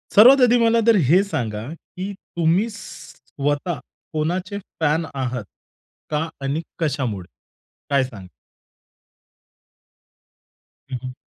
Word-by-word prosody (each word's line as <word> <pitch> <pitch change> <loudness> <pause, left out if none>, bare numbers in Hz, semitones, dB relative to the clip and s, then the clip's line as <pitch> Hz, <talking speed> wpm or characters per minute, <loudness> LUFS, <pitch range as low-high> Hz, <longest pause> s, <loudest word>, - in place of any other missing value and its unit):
सर्वात 255 +6 +9
आधी 245 -1 +6
मला 230 0 +4
तर 230 - +7
हे 175 +7 +6
सांगा, 115 - -3
की 185 +4 -7
तुम्ही 175 +1 0
स्वतः 145 -6 -4 0.3
कोणाचे 180 +6 -1 0.2
फॅन 160 +1 +2
आहात 125 -4 -2 0.7
का 155 +1 0 0.2
आणि 140 +4 0 0.2
कशामुळे? 130 - -1 0.6
काय 140 -1 +3
सांग? 105 -8 -8 2.6
हं, 130 - -1
हं. 130 0 -5
155 Hz, 100 wpm, -22 LUFS, 130-190 Hz, 2.6 s, सर्वात